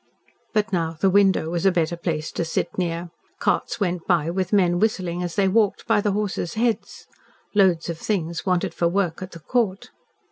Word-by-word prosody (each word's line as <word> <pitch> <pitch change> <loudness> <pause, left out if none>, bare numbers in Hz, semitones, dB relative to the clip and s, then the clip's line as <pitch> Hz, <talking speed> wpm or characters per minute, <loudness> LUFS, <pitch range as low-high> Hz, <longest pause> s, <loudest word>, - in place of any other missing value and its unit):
But 215 0 +1
now 165 -2 -1
the 190 +1 +3
window 190 -4 +3
was 170 -1 -1
a 195 - +5
better 170 -1 0
place 165 -3 -3
to - - -2
sit 165 - -2
near. 170 -1 -2 0.3
Carts - - 0
went 180 -4 -2
by 170 -3 +2
with 185 0 -2
men 180 -4 +3
whistling 180 -5 0
as 175 -1 -4
they 200 -2 +3
walked 205 +1 +2
by 220 -2 +3
the 205 -1 0
horses 200 -3 -2
heads. 230 0 -1 0.5
Loads 185 -5 +3
of 170 -1 -4
things 170 -5 -2
wanted 180 -2 0
for 170 - +1
work 175 -2 -1
at 185 0 -7
the 170 - -9
Court. 200 +2 -1
180 Hz, 190 wpm, -23 LUFS, 170-200 Hz, 0.5 s, a